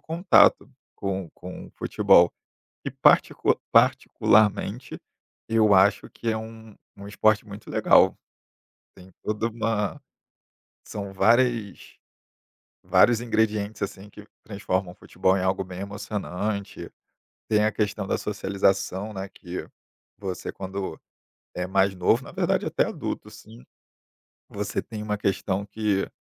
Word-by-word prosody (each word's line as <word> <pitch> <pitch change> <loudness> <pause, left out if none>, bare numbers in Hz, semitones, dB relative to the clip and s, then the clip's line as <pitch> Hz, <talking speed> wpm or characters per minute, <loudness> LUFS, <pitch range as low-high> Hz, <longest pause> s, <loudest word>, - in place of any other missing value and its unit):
contato 170 +4 +3 0.3
com 95 -3 -3
com 90 +1 -9
o - - -16
futebol 85 0 +4 0.5
e, - - -3
particu - - +3
particularmente, 110 +2 +2 0.5
eu 110 -2 +3
acho 100 +2 +3
que 115 - -6
é 110 - +1
um 110 -1 -9 0.2
um 100 0 -10
esporte 105 +1 +2
muito 105 0 -10
legal, - - +4 0.8
tem 95 0 -15
toda 105 +2 -1
uma 115 +3 -2 0.9
são 100 -2 -6
várias 115 0 +1 0.9
vários 120 -1 +4
ingredientes, 110 -3 -1
assim, 100 +1 -7
que 105 0 -13 0.2
transformam 95 -3 -3
o - - -23
futebol 95 +1 0
em 95 - -2
algo 95 +1 0
bem 90 -1 -9
emocionante, 100 0 -5 0.6
tem 105 -1 +3
a 110 - +1
questão 105 -2 -2
da - - 0
socialização, 100 0 -1
né, 95 0 -5
que 90 -1 -8 0.5
você 95 -3 -5
quando 95 0 -6 0.6
é 90 - -2
mais 95 +1 +2
novo, 100 +7 +2
na - - -11
verdade - - 0
até - - +1
adulto, - - -5
sim, 60 - -14 0.9
você - - -3
tem 110 -2 -8
uma 105 -1 -2
questão 100 0 -1
que. 105 -1 -1
100 Hz, 125 wpm, -25 LUFS, 95-110 Hz, 0.9 s, futebol